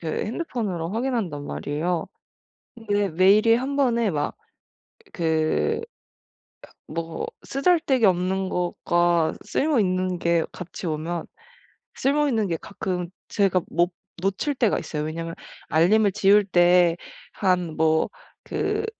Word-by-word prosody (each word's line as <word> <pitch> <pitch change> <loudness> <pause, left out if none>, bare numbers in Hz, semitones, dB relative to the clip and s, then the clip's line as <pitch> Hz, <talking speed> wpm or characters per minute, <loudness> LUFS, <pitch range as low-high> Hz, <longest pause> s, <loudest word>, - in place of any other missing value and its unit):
그 165 - -5 0.2
핸드폰으로 210 - -3
확인한단 220 - -2
말이에요. 160 +4 -2 0.7
근데 205 -3 -1
메일이 200 +7 +5
한번에 250 -4 +1
막 150 -3 -2 0.8
그 160 -2 0 1.1
뭐 165 0 -4 0.2
쓰잘데기 275 -4 +2
없는 185 +1 +2
것과 175 -1 +1
쓸모있는 185 - +1
게 170 -1 +2
같이 180 0 -7
오면 160 +2 -3 0.7
쓸모있는 275 -6 +1
게 170 - -1
가끔 180 0 -4 0.2
제가 195 -3 +2
못 175 +2 +1 0.3
놓칠 195 +10 -1
때가 235 -5 +2
있어요. 150 -1 -4
왜냐하면 165 +2 -4 0.3
알림을 200 +6 +4
지울 205 0 +4
때 175 -2 +4 0.4
한 180 -5 0
뭐 160 0 +2 0.3
그 - - -2
185 Hz, 225 characters per minute, -24 LUFS, 165-220 Hz, 1.1 s, 메일이